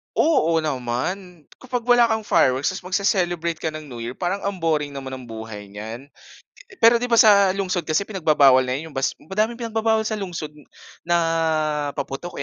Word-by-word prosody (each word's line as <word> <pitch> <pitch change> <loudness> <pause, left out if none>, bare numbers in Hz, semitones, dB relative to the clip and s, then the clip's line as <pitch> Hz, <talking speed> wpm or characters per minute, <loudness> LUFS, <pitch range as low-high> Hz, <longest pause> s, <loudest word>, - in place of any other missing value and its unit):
Oo 165 - +3
naman. 155 +7 -3 0.2
Kapag 250 -2 -4
wala 245 -1 +6
kang 220 -1 0
fireworks 130 -8 +2
tapos 185 -1 -7
magce-celebrate 175 -4 0
ka 160 -1 -4
ng 155 -2 -8
New 120 - -8
Year, 115 +1 -5
parang 185 +6 -3
ang 195 -4 -3
boring 150 -3 0
naman 135 -1 -6
ng 130 -1 -8
buhay 110 -2 -8
niyan. 110 +5 -7 0.8
Pero 230 +1 +7
'di 245 - -2
ba, 235 - +2
sa 200 -4 +6
lungsod 185 -3 -2
kasi 155 +5 +1
pinagbabawal 155 -10 +4
na 130 0 -1
'yong 160 +4 -6
bas 135 -1 -1
madaming 215 +7 -1
pinagbabawal 225 -1 0
sa 215 -1 -3
lungsod 170 -5 -5 0.6
na 175 - +3 0.8
paputok, 140 +5 -5
170 Hz, 170 wpm, -22 LUFS, 135-200 Hz, 0.8 s, Pero